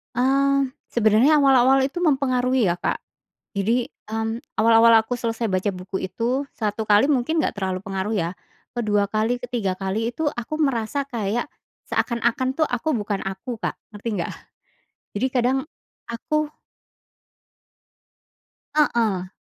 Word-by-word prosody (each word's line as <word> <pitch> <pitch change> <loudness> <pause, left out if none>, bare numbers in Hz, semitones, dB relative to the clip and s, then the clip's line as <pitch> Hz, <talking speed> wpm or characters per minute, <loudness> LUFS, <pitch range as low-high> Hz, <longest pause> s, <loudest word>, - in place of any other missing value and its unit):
Mmm, 275 +2 +2 0.2
sebenarnya 240 +7 +4
awal-awal 270 -1 +5
itu 285 - -10
mempengaruhi 260 - +2
ya, 170 - 0
Kak. - - -2 0.6
Jadi, 230 +5 +1 0.2
mmm, 225 +1 -2 0.2
awal-awal 225 0 +6
aku 240 +3 -4
selesai 230 -1 -2
baca 185 +2 0
buku 185 +1 -4
itu 245 +8 -1
1 215 0 -2
kali 210 +6 +4
mungkin 295 +4 +2
nggak 225 - -2
terlalu 190 -2 -2
pengaruh 195 +2 -3
ya, 170 -5 0 0.5
ke-2 205 -3 +1
kali, 220 +4 0
ke-3 235 -6 -2
kali 210 +5 -2
itu 315 +2 0
aku 240 +6 -4
merasa 275 0 0
kayak 235 +2 -2 0.4
seakan-akan 240 +2 0
tuh, 315 - +3
aku 245 +6 -1
bukan 205 -3 -2
aku, 195 +6 -5
Kak, - - -1 0.2
ngerti 210 +3 -5
nggak? - - -3 0.9
Jadi 255 - +1
kadang 250 +1 +2 0.5
aku 305 +6 -1 2.3
Heeh. 225 -11 +2
235 Hz, 130 wpm, -23 LUFS, 210-260 Hz, 2.3 s, awal-awal